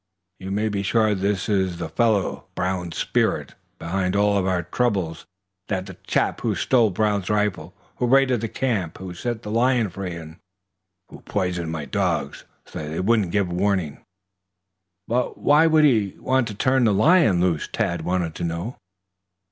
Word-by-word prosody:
"You 95 - -7
may 105 +3 0
be 100 -2 -1
sure 110 +1 +2
this 100 -1 -1
is 95 -4 0
the 85 - -4
fellow, 110 -5 0
Brown's 90 -2 -2
'spirit,' - - 0 0.2
behind 90 +3 -2
all 100 0 +3
our 90 -2 0
troubles. 95 -4 -1 0.4
He's 95 - -1
the 95 -1 -10
chap - - 0
who - - 0
stole 120 -4 +3
Brown's 100 0 0
rifle, 105 -4 -1 0.2
who 125 - 0
raided 130 -2 +3
this 115 - -3
camp, 105 -11 -2
who 95 -1 -7
set 120 +5 -4
the 105 - -6
lion 120 -2 +2
free 90 -1 -5
and 80 -1 -10 0.7
who - - -12
poisoned 90 -4 -2
my 80 -3 -4
dogs - - -2 0.2
so - - -8
they 80 +1 -4
wouldn't 105 -1 +2
give 100 -3 0
warning." 90 -5 -1 1.0
"But 125 +2 -1
why 155 +3 +4
should 155 -1 +4
he 110 -9 +3
want 130 -2 +1
to 105 - -6
turn 130 +3 +2
the 105 - +3
lion 140 - +4
loose?" 85 -3 +1
Tad 85 -1 -1
wanted 90 -1 -1
to - - -6
know. 85 +8 -4
100 Hz, 165 wpm, -23 LUFS, 90-115 Hz, 1.0 s, why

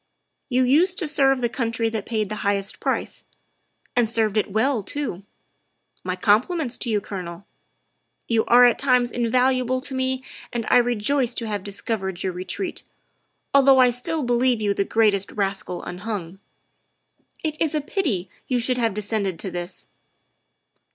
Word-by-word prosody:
You 255 0 +2
used 335 +9 +3
to 340 - 0
serve 270 -3 +3
the 240 - +2
country 230 -1 -1
that 220 -2 -4
paid 215 -3 -1
the 215 - -4
highest 200 -1 -1
price - - -2 0.7
and 240 -3 +3
served 220 -2 +1
it 210 -1 0
well 230 +3 +1
too. 250 -3 -4 0.8
My 185 0 -2
compliments 240 - +1
to 240 - -3
you, 215 -2 +2
Colonel. 185 -2 -7 0.8
You 225 -1 +2
are 245 +1 +7
at 240 - +3
times 250 -3 +2
invaluable 255 +1 +1
to 270 - -2
me 260 0 -1 0.3
and 235 -2 -3
I - - +7
rejoice 245 +2 +1
to 230 - -3
have 205 -3 -3
discovered 195 -2 -3
your 185 - -1
retreat, 185 - -4 0.7
although 275 -1 +6
I 250 -1 +6
still 265 +6 -1
believe 245 0 +2
you 205 -2 +1
the 200 0 0
greatest 205 -3 +2
rascal 195 -3 -2
unhung. 185 -1 -5 1.0
It 310 -2 -1
is 320 -1 +1
a - - +2
pity 280 - -2 0.2
you 250 - +1
should 250 +1 0
have 225 -4 0
descended 205 -3 -1
to 190 - -4
this. 175 +1 -6
230 Hz, 160 wpm, -23 LUFS, 200-255 Hz, 1.0 s, are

